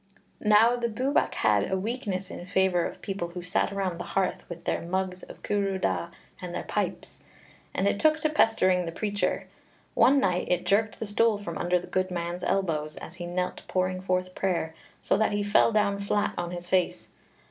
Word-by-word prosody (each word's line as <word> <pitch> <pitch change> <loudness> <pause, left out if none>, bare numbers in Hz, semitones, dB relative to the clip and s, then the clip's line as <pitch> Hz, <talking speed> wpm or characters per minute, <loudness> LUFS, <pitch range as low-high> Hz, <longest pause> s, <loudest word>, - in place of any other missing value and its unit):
Now 220 +3 +5
the 240 -1 0
Bwbach 255 +6 0
had - - +2
a 190 - +2
weakness 200 -3 -3
in - - -7
favour 185 -2 +2
of - - -11
people 195 -4 -3
who 175 +1 -7
sat 180 +3 0
around 190 -3 -2
the - - -3
hearth 190 -1 0
with 170 -1 -8
their - - -1
mugs 185 +1 -2
of - - -12
cwrw 200 -2 0
da 90 - 0 0.3
and - - -5
their - - -3
pipes, - - -3 0.5
and 195 - +1
it 200 - +1
took 310 0 +4
to 310 - +2
pestering 185 - +3
the - - -3
preacher. 205 +1 -1 0.5
One 280 +1 +5
night 180 -6 +1
it 180 -1 +1
jerked 215 +2 +2
the - - -4
stool 215 +1 +3
from 175 -5 -6
under 175 +1 +2
the 180 - -5
good 185 0 -1
man's 175 0 -4
elbows, 160 -6 0
as 175 - -9
he 175 -1 -5
knelt 180 +1 -2
pouring 185 0 0
forth 185 -1 -1
prayer, 175 -5 -1 0.3
so - - +2
that 220 -1 +2
he 205 0 0
fell 205 +2 +4
down 205 -2 +2
flat 200 +1 0
on 175 0 -3
his 175 0 -6
face. 185 0 0
190 Hz, 200 wpm, -27 LUFS, 180-205 Hz, 0.5 s, Now